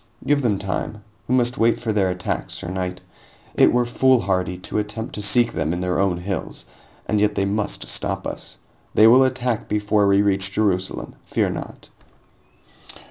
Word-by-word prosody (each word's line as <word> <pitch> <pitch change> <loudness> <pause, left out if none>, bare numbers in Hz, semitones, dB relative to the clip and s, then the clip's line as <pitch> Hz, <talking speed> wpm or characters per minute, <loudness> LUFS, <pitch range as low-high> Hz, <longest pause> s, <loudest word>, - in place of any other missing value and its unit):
"Give 145 0 +2
them 110 -6 +1
time. 100 +2 -4 0.2
We 130 - +2
must 120 -1 +1
wait 115 +1 +3
for 115 -3 -2
their 100 -3 +2
attack, 90 0 -3
sir 85 - -6
knight. 90 0 -4 0.5
It - - +5
were 120 0 +2
foolhardy 95 -8 +2
to 90 +3 -3
attempt 105 +2 -5
to 105 - -5
seek 120 +3 +2
them 80 +1 -1
in 90 - -3
their 90 0 0
own 95 -3 +1
hills, 90 0 -5 0.4
and 105 -1 0
yet 105 0 +2
they 100 - +1
must 105 +1 -2
stop - - -3
us. - - -6 0.4
They 110 - +7
will 125 +4 +7
attack 125 -3 -1
before 105 -1 +2
we 100 +1 +4
reach 95 -1 +1
Jerusalem, 95 -3 -1
fear - - 0
not." - - -8
105 Hz, 175 wpm, -22 LUFS, 95-115 Hz, 0.5 s, They